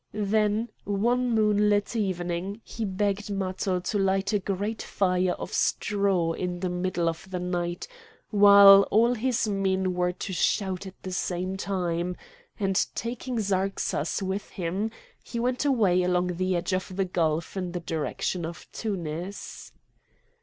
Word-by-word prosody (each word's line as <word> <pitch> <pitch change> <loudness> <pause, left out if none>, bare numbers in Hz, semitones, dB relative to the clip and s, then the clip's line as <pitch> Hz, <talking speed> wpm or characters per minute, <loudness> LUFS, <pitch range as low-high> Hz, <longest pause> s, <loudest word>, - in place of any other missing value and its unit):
Then 210 +2 +1
one 240 +5 +1
moonlight 210 0 +2
evening 185 -1 -2
he 225 - -5
begged 200 +1 -1
Matho 190 -1 -1
to 205 +3 -1
light 195 +1 +1
a 205 - +3
great 200 +3 -3
fire 185 -2 +1
of - - -7
straw 195 -5 +1
in 180 +1 -3
the 185 -2 -1
middle 180 -1 -1
of 165 +3 -3
the 185 - -3
night, 175 -1 -3 0.4
while 200 -1 +8
all 230 +3 +4
his 245 -1 0
men 190 -2 0
were 180 0 +1
to 185 +1 -6
shout 190 +1 0
at 190 - -10
the 185 - -5
same 185 +1 -2
time; 180 -2 -2 0.4
and 195 -2 +2
taking 240 +1 -4
Zarxas 195 -4 -1
with 190 +2 -3
him, 190 +4 -2 0.3
he 235 - -5
went 250 +4 0
away 210 -10 +3
along 180 -1 0
the 185 0 0
edge 175 +2 -1
of 185 0 -2
the 195 0 +1
gulf 165 -2 -1
in 180 -2 -3
the 175 - -3
direction 165 +2 -2
of 165 0 -6
Tunis. 180 -2 -5
190 Hz, 145 wpm, -27 LUFS, 180-205 Hz, 0.4 s, while